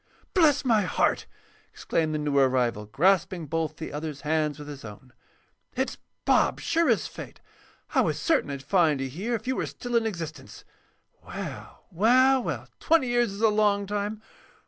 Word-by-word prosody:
"Bless 300 -7 +4
my 225 -4 +4
heart!" 180 - 0 0.4
exclaimed 155 -2 -1
the - - +1
new 150 -1 -2
arrival, 125 -5 +1
grasping 175 - +2
both 160 0 -2
the 160 - -7
other's 150 -2 -5
hands 155 -1 0
with 150 -1 -9
his 145 -2 -9
own. 115 +4 -11 0.6
"It's - - -2 0.3
Bob, - - +3
sure 335 0 +1
as - - +2
fate. - - -9 0.5
I - - +4
was - - 0
certain 320 - +1
I'd 140 -1 -5
find 155 -2 +2
you 135 - -2
here 200 - -3
if 225 - -6
you 260 +1 -1
were - - -2
still 245 -1 -5
in 230 -1 +3
existence. 160 -8 -7 0.6
Well, - - -8
well, 255 +8 +4
well!—twenty 300 +1 0
years 240 -3 +2
is 200 +2 -7
a 225 - +5
long 210 -1 +2
time. 205 +2 -3
175 Hz, 170 wpm, -26 LUFS, 150-230 Hz, 0.6 s, a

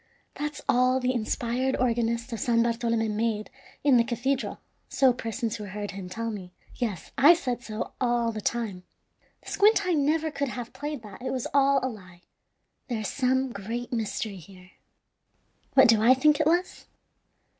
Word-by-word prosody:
That's 295 0 -4
all 255 +1 +3
the 255 0 0
inspired 245 +2 -1
organist 235 0 0
of 225 - -4
San 230 -1 +2
Bartolome 230 -1 0
made 215 0 -2 0.3
in 280 -3 +5
the 235 - +5
cathedral, 255 +3 -2 0.3
so 265 -2 +4
persons 230 -1 -3
who 210 - -7
heard 205 +1 -5
him 185 -1 -7
tell 230 +4 -3
me. 185 -4 -8 0.2
Yes, 215 -9 -3
I 305 +6 +8
said 250 -7 -3
so 215 -2 -5
all 240 -2 +1
the 215 -1 -5
time. 210 -4 -2 0.6
The - - -9
squint 405 -1 +4
eye 365 - +1
never 310 +1 +1
could 280 -1 -2
have 240 -1 -6
played 295 -4 -5
that. 210 +2 -11
It 260 - -3
was 255 -2 -2
all 275 0 +4
a - - +1
lie. 185 -7 -11 0.6
There 235 -5 -2
is 210 - -3
some 260 0 +1
great 235 +5 -5
mystery 220 -2 -3
here. 185 +1 -15 1.0
What 265 -1 +8
do 225 -2 +5
I 245 +4 +6
think 295 +2 +3
it - - +2
was? 350 +3 0
240 Hz, 175 wpm, -27 LUFS, 220-265 Hz, 1.0 s, I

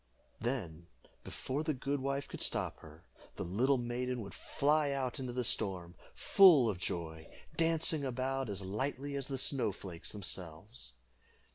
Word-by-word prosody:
Then, 95 -9 -3 0.4
before 135 +3 -3
the 155 -2 -1
good 140 +2 -1
wife 140 +1 -2
could - - -7
stop - - +1
her, 80 +1 -14 0.3
the - - -3
little 125 +10 +2
maiden 125 +1 -2
would 100 - -8
fly 150 +1 +1
out 135 -3 -1
into 130 -2 -3
the 125 +1 -1
storm, 95 -6 -1 0.2
full 170 -11 +7
of 90 - -7
joy, 80 -3 -4 0.2
dancing 165 -2 +2
about 130 0 -1
as 100 -1 -2
lightly 135 +8 -2
as 140 -1 -3
the 135 -2 -3
snow 130 -4 +2
flakes 90 -3 -7
themselves. 80 - -5
125 Hz, 150 wpm, -34 LUFS, 95-140 Hz, 0.4 s, full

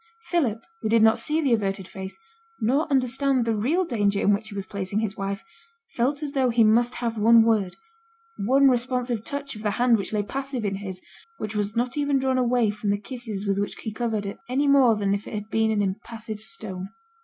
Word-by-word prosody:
Philip, 240 - +1 0.2
who 220 - -1
did 225 0 +4
not 220 0 +5
see 310 +2 +1
the 270 -5 +2
averted 195 -3 -1
face, 190 0 -8 0.4
nor 270 +9 +1
understand 265 -1 +2
the 225 -1 +1
real 300 - +1
danger 205 -7 +1
in 205 - +3
which 215 +2 -2
he 205 - -9
was 195 -1 -4
placing 200 +1 -4
his 215 -2 -2
wife, 195 0 -4 0.5
felt 280 +5 0
as 290 - -3
though 265 -3 +2
he 230 -1 +4
must 235 +3 +3
have 230 -2 -2
one 230 +1 +7
word, 215 -5 +1 0.6
one 270 +7 +4
responsive 245 -2 0
touch 280 -1 -5
of 210 - -9
the 215 - 0
hand 235 +2 +3
which 195 - -4
lay 210 -1 0
passive 270 +1 -4
in 195 -1 -1
his, 190 -2 -7 0.3
which 215 0 -5
was 210 +1 -1
not 245 +3 -1
even 285 -1 +2
drawn 260 -1 +1
away 240 -3 +2
from 210 0 -4
the 200 - +2
kisses 215 -2 -6
with 200 0 0
which 205 - -2
he 220 - -6
covered 220 -2 -2
it, 200 - -6
any 275 +3 +1
more 270 -5 +5
than 200 -2 0
if 200 0 -3
it - - -6
had 210 +1 -6
been 220 0 +2
an 210 -2 +1
impassive 215 +2 -5
stone. 195 - -6
225 Hz, 220 wpm, -25 LUFS, 205-255 Hz, 0.6 s, one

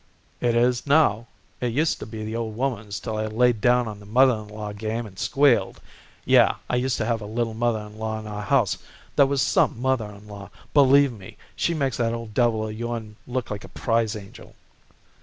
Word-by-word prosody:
"It 120 -1 +1
is, 120 +2 +2
now. 130 -7 +3 0.3
It 120 -2 -1
used 155 +5 +1
to - - -7
be 110 -1 -6
the 110 +1 -4
old 115 -2 -3
woman's 110 -5 -3
till 110 -2 -4
I 110 0 -1
laid 115 0 +2
down 125 0 +3
on 105 -2 -7
the 100 - -14
mother 130 +4 +5
in 110 -2 -6
law 105 0 -6
game 110 +3 -3
and 95 -3 -12
squealed. 140 -3 +2 0.5
Yeh, - - +5
I - - 0
used 125 0 0
to 110 - -1
have 115 -1 -1
a 105 - -6
little 115 +1 -2
mother 115 -1 0
in 105 +1 -11
law 110 0 -2
in 110 - -9
our 105 -1 -5
house 115 -1 +1 0.4
that 140 - +5
was 140 -1 +1
some 115 - +2
mother 130 -4 0
in 105 +1 -13
law. 100 -2 -9 0.2
Believe 140 -1 +6
me, 95 -5 -12 0.2
she 170 - 0
makes 135 -5 -1
that 115 -1 0
old 115 -2 -7
devil 110 -2 +1
of 105 - -5
yourn 115 -1 -5
look 125 -2 -3
like 100 -1 -5
a - - -11
prize 115 -1 0
angel." 100 -2 -11
115 Hz, 215 wpm, -24 LUFS, 105-125 Hz, 0.5 s, Believe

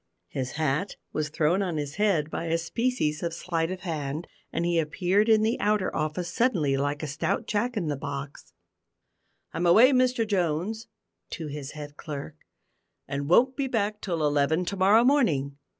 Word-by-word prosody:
His 130 -1 -4
hat 155 +5 -1 0.2
was 155 0 -1
thrown 160 +5 +1
on 180 -5 -2
his 145 +1 -4
head 180 -8 +1
by 165 - -3
a 165 0 +1
species 170 -4 -1
of 170 -1 -2
sleight 165 -2 -1
of 185 0 -5
hand, 155 -3 -3 0.3
and 170 - -1
he 170 -1 +2
appeared 185 +7 +1
in 215 -1 +5
the 225 +3 +1
outer 210 -2 +1
office 155 +3 -2
suddenly, 180 - +2
like 145 +2 -1
a - - -2
stout 140 +2 -1
Jack 230 +3 -1
in 185 - -1
the 150 -2 -1
box. 140 0 -7 1.0
"I'm 175 +2 0
away, 225 +10 +7
Mr 255 -3 +2
Jones," 190 +3 -1 0.5
(to 160 -3 -5
his 140 -1 -6
head 145 -1 -9
clerk), 145 -1 -7 0.7
"and 140 +1 -3
won't 255 +9 +5
be 275 -2 -1
back 210 -4 -1
till 170 -5 -1
eleven 150 +4 +2
to 200 - -3
morrow 200 +5 +5
morning. 155 - +2
170 Hz, 175 wpm, -27 LUFS, 150-210 Hz, 1.0 s, away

